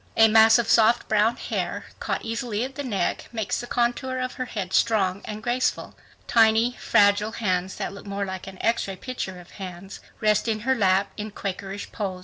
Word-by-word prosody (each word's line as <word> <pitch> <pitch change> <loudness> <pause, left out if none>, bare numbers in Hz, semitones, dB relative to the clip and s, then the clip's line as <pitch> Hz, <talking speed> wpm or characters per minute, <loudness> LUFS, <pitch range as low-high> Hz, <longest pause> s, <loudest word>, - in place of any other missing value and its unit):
A 225 - +8
mass 220 +1 +7
of 235 -2 0
soft 230 +1 +4
brown 215 +2 +3
hair, - - -3
caught - - -3
easily 225 -1 -2
at 265 +1 -5
the 285 +1 -5
neck, 200 -9 -2
makes 220 -4 -2
the 240 - -6
contour 245 +2 0
of 255 0 -3
her 255 - -4
head 195 -6 -5
strong 200 -4 +2
and 215 0 -6
graceful. 245 +2 -1 0.3
Tiny, 225 +1 +4
fragile 205 +2 +3
hands 185 -4 -1
that - - -4
look 200 +1 -11
more 200 0 -2
like 190 -1 -6
an 190 -1 -9
X 230 -2 +1
ray 195 - -5
picture 190 -4 -5
of 175 - -15
hands, 185 +1 -8 0.2
rest 215 +1 +2
in 215 -1 -1
her 265 +4 +2
lap 195 -4 +2
in 215 0 -4
Quakerish 195 0 -6
pose. 195 -4 -4
215 Hz, 195 wpm, -25 LUFS, 195-235 Hz, 0.3 s, A